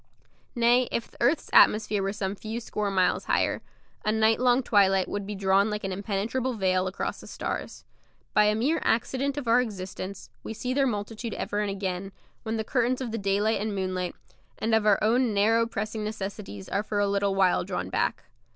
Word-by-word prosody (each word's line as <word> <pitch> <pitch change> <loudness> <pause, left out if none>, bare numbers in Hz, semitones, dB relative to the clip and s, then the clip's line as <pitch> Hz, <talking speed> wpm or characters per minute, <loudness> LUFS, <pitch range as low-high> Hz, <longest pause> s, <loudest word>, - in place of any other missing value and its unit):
Nay, 240 +1 +4
if 235 - -3
the - - -19
earth's 260 +7 +1
atmosphere 210 -1 +5
were 195 0 -1
some 200 -2 -3
few 220 +3 -5
score 210 -3 -3
miles 185 -2 +1
higher, - - +1 0.4
a 215 - +1
night 220 0 +3
long 250 +1 +3
twilight 195 -4 +3
would 205 -1 -4
be 210 - -4
drawn 195 +1 +3
like 210 0 -3
an 195 - -2
impenetrable 210 +6 -2
veil 185 -2 +1
across 185 - -4
the - - -12
stars. - - -5 0.5
By 210 - +5
a 210 0 +3
mere 275 +9 +1
accident 265 +4 0
of 280 -4 -4
our 235 +2 +5
existence 195 -3 -6
we 220 - -6
see 250 +3 -2
their 275 0 +2
multitude 215 +1 -4
ever 205 - -2
and 210 -1 0
again, 190 -1 -4 0.3
when 225 0 -3
the 220 - -1
curtains 250 +2 0
of 250 -4 -4
the 230 - -3
daylight 200 +2 +1
and 210 -1 -2
moonlight, 185 -2 -2 0.4
and 220 +1 -1
of 220 -1 +3
our 205 -2 +6
own 230 0 +2
narrow 225 +3 +3
pressing 215 0 -4
necessities, 200 - -6
are 200 - 0
for 210 0 -4
a 205 - +3
little 200 0 +1
while 190 -2 +3
drawn - - -4
back. - - 0
210 Hz, 195 wpm, -27 LUFS, 195-230 Hz, 0.5 s, our